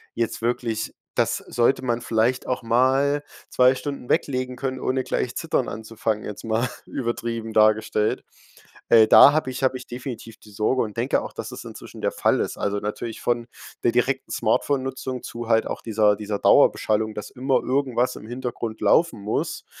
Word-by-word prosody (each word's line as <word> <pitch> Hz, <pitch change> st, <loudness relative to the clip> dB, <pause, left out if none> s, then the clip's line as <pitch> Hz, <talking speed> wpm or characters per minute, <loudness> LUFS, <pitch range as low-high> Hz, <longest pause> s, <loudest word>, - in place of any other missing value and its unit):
jetzt 115 Hz, -1 st, -2 dB
wirklich 115 Hz, -2 st, -2 dB, 0.2 s
das -, -, +1 dB
sollte 120 Hz, +3 st, 0 dB
man 120 Hz, -2 st, -1 dB
vielleicht 115 Hz, +2 st, +1 dB
auch 125 Hz, -, -1 dB
mal 135 Hz, +5 st, +2 dB, 0.3 s
2 125 Hz, 0 st, +5 dB
Stunden 140 Hz, -2 st, -6 dB
weglegen 130 Hz, -2 st, 0 dB
können, 130 Hz, 0 st, -3 dB
ohne 130 Hz, 0 st, -1 dB
gleich -, -, -2 dB
Zittern -, -, -1 dB
anzufangen, 110 Hz, -1 st, -3 dB
jetzt 105 Hz, -, -7 dB
mal 115 Hz, +3 st, 0 dB, 0.2 s
übertrieben 115 Hz, -3 st, -4 dB
dargestellt. 110 Hz, 0 st, +2 dB, 0.7 s
Äh, 110 Hz, -2 st, +7 dB
da 140 Hz, -, +9 dB
habe 155 Hz, -3 st, 0 dB
ich 130 Hz, -, -6 dB
habe 130 Hz, 0 st, +2 dB
ich 125 Hz, -, -12 dB
definitiv 120 Hz, -3 st, -7 dB
die 105 Hz, -, -16 dB
Sorge 110 Hz, +5 st, +1 dB
und 105 Hz, -2 st, -6 dB
denke 120 Hz, +4 st, +1 dB
auch, -, -, -8 dB
dass -, -, -6 dB
es -, -, -8 dB
inzwischen -, -, -10 dB
der -, -, 0 dB
Fall -, -, +1 dB
ist. -, -, -2 dB
Also, 100 Hz, 0 st, -1 dB
natürlich 110 Hz, +2 st, -5 dB
von 120 Hz, -1 st, -1 dB, 0.4 s
der 120 Hz, -, +3 dB
direkten 130 Hz, +2 st, 0 dB
Smartphonenutzung 130 Hz, +2 st, -1 dB
zu 120 Hz, 0 st, -6 dB
halt 115 Hz, -1 st, +3 dB
auch -, -, -5 dB
dieser 105 Hz, -2 st, +2 dB
dieser 105 Hz, -1 st, -3 dB
Dauerbeschallung, 110 Hz, 0 st, +3 dB
dass 105 Hz, -, -6 dB
immer 130 Hz, +1 st, 0 dB
irgendwas 130 Hz, -2 st, 0 dB
im 110 Hz, -, -10 dB
Hintergrund 120 Hz, -2 st, -5 dB
laufen 110 Hz, +6 st, +3 dB
muss. 105 Hz, +2 st, -3 dB
120 Hz, 175 wpm, -23 LUFS, 110-130 Hz, 0.7 s, da